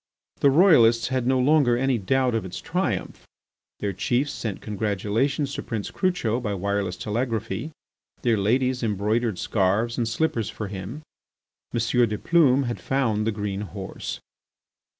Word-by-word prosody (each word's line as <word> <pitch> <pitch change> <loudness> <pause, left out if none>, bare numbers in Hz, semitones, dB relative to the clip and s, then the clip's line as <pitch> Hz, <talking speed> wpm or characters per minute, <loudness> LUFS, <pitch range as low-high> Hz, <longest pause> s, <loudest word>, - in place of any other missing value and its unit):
The 140 - +5
Royalists 130 - +5
had 130 -2 -1
no 130 0 +3
longer 130 -2 +4
any 130 -1 +1
doubt 125 +5 +1
of 115 - 0
its 90 -1 -6
triumph. 160 - -3 0.5
Their 100 -1 -1
chiefs 125 +9 0
sent 105 -5 -4
congratulations 110 +7 -1
to - - -3
Prince 110 -4 -4
Crucho 175 - 0
by 105 -5 -2
wireless 100 -1 -2
telegraphy. 115 +2 -2 0.5
Their 115 -3 +3
ladies 125 +5 +1
embroidered 110 0 0
scarves 105 +6 0
and 115 - 0
slippers 115 -2 -1
for 105 -1 -5
him. 100 +10 -7 0.7
M. 120 - -1 0.3
de 105 - -2
Plume 140 -2 +4
had 120 -2 -3
found 115 -6 0
the - - +2
green 105 -2 -3
horse. 100 -7 -6
115 Hz, 145 wpm, -25 LUFS, 105-130 Hz, 0.7 s, The